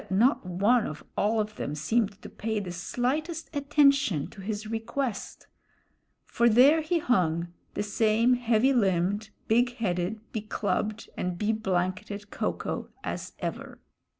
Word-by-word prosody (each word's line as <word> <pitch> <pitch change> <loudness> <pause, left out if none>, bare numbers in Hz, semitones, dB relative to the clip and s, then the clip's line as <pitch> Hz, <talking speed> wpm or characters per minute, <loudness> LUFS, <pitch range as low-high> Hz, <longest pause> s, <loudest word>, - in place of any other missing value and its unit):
But - - -18
not 225 +9 +3
one 200 +6 +2
of 150 - -7
all 220 +2 +2
of 215 0 -3
them 145 - -3
seemed 205 +5 0
to - - -7
pay 220 0 -3
the 185 -3 -5
slightest 300 - -2
attention 280 - +3
to 195 - -11
his 210 +2 -4
request; 225 +1 -3 0.8
for 235 0 +3
there 270 +8 +6
he 340 +3 0
hung, 175 - +1 0.3
the - - 0
same 220 +3 +3
heavy 245 +1 +3
limbed, 200 -1 +1 0.2
big 240 +2 +3
headed, 185 0 -1
be 220 - -3
clubbed, 210 0 -2
and 180 -1 -2
be 210 +3 +1
blanketed 195 0 -2
Ko - - 0
ko - - -5
as - - -5
ever. - - -5
215 Hz, 150 wpm, -28 LUFS, 190-245 Hz, 0.8 s, there